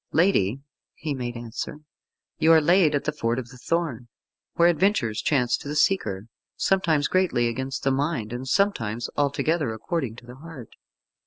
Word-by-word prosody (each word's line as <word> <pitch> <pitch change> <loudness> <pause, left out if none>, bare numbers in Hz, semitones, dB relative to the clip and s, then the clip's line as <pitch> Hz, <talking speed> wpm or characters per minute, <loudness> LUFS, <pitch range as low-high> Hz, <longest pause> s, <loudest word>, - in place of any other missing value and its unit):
"Lady," 140 - +2 0.3
he 150 -1 -4
made 120 -2 -4
answer, 120 +6 -6 0.6
"you 160 - +5
are 160 - +8
laid 165 -1 +4
at 145 - -1
the 150 - -1
Ford 120 -5 -1
of 125 -2 -5
the 125 - -13
Thorn, 155 -7 -2 0.5
where 170 - +5
adventures 170 - +1
chance 125 -5 +2
to - - -10
the 145 - -4
seeker, 110 - +1 0.3
sometimes 160 -7 +2
greatly 185 -11 +2
against 130 +3 -4
the 135 - +2
mind, 135 -5 -1
and 125 +2 -5
sometimes 120 - 0
altogether 145 0 0
according 135 - -3
to 120 - -14
the 125 +1 -11
heart." 145 -6 -10
140 Hz, 165 wpm, -25 LUFS, 120-165 Hz, 0.6 s, are